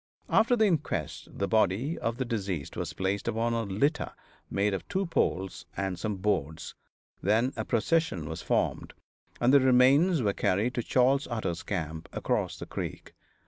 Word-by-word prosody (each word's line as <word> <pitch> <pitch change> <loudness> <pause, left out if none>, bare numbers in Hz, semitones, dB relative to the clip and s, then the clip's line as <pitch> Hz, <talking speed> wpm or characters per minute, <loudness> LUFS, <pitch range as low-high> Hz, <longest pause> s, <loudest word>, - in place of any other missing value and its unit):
After 230 +2 +4
the 220 -2 +4
inquest 165 -7 -1
the 100 - -2
body 110 - +2
of 115 0 -2
the 130 - -1
deceased 100 - -3
was - - -3
placed 95 +3 -2
upon 115 +1 0
a 115 - 0
litter 140 +11 0 0.4
made 100 +1 +1
of 95 - -4
two 195 -1 -1
poles 95 - -1
and 95 -2 -2
some 105 +1 -2
boards; 95 -6 -2 0.5
then 115 +6 +2
a - - -2
procession 115 - 0
was 80 0 -5
formed, - - -1 0.5
and 120 +2 +3
the 140 - +8
remains 130 +5 +5
were 100 -2 +2
carried 105 +8 +1
to 120 - -1
Charley 130 +3 +3
Utter's 110 -8 -2
camp, 80 -4 -4
across - - -1
the - - -7
creek. - - -6
110 Hz, 165 wpm, -29 LUFS, 95-135 Hz, 0.5 s, the